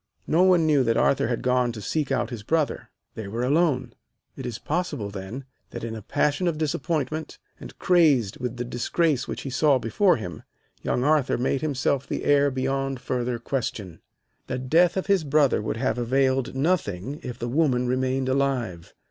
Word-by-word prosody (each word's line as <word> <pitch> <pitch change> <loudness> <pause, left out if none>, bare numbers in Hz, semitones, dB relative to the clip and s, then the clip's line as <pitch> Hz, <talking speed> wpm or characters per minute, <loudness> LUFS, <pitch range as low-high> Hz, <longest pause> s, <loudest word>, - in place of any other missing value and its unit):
No 165 +3 +2
one 180 -3 +5
knew 150 -4 +4
that 115 0 +2
Arthur 135 - +2
had 120 -1 -2
gone 125 -1 +2
to 110 - -7
seek 145 +7 -2
out 120 0 0
his 115 -3 -5
brother. 155 +7 -1 0.2
They 110 -3 -6
were 115 +4 -3
alone. 135 -4 +1 0.4
It - - -6
is 120 -2 -4
possible, 150 - -3
then, 100 +7 -7 0.2
that 120 - -7
in 115 -1 -4
a 110 - -7
passion 150 - 0
of 165 -3 0
disappointment, 155 0 -2 0.2
and - - -11
crazed 150 - +3
with 125 -1 -4
the 120 - -3
disgrace 130 +3 0
which - - -5
he 135 - -5
saw 140 +1 +3
before 175 - +2
him, 90 -6 -7 0.4
young 125 - -1
Arthur 150 -2 +2
made 130 +2 0
himself 140 -2 0
the - - -3
heir 145 0 +4
beyond 135 0 -2
further 125 -1 -2
question. 115 -8 -4 0.5
The - - -2
death 165 +9 +3
of 190 - -1
his 195 -4 +2
brother 145 -5 +3
would 105 - -3
have 125 0 -1
availed 130 +1 +1
nothing 140 - -1
if 125 -5 -6
the 120 - -4
woman 125 -2 +1
remained 130 +1 0
alive. 130 -10 -1
130 Hz, 180 wpm, -25 LUFS, 120-150 Hz, 0.5 s, one